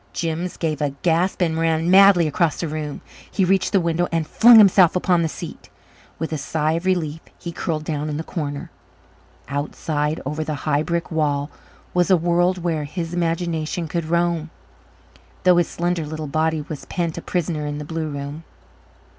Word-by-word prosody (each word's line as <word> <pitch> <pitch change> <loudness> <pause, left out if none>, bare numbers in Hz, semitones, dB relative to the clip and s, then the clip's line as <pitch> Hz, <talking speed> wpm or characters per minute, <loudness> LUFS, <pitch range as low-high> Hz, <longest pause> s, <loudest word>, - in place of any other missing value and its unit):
Jims 170 +1 -3
gave 155 -3 -2
a 140 -2 -1
gasp 175 +3 +1
and 160 -1 0
ran 165 +1 +1
madly 195 -3 +7
across 155 +1 0
the 170 - -2
room. 150 -1 -5 0.3
He 195 - +1
reached 190 +1 +2
the 195 - +4
window 170 0 0
and 165 -1 0
flung 230 +8 +7
himself 190 -5 +6
upon 180 -1 +2
the 165 - 0
seat. - - -9 0.5
With 160 0 -4
a 155 - -2
sigh 155 +2 -1
of 165 +3 -2
relief 165 -4 0 0.2
he 170 - -6
curled 160 -2 -3
down 150 -1 -3
in 145 - -3
the 160 - -3
corner. 145 -4 -5 0.8
Outside, 150 +2 -2
over 150 +3 -2
the 155 -1 -3
high 145 -1 +2
brick 170 +1 -2
wall, 145 -2 0 0.4
was 180 0 +2
a 185 - +6
world 175 +1 +1
where 160 -4 -1
his 165 +2 -5
imagination 170 -1 -1
could 170 +1 -2
roam, 170 -1 0 0.9
though 180 -1 +5
his 175 - +3
slender 175 -1 -1
little 155 0 -5
body 155 +2 0
was 150 - -7
pent 170 -2 -3
a - - -9
prisoner 160 -4 -2
in 145 0 -4
the 150 - -6
blue 160 0 -3
room. 145 +2 -6
165 Hz, 180 wpm, -22 LUFS, 155-175 Hz, 0.9 s, madly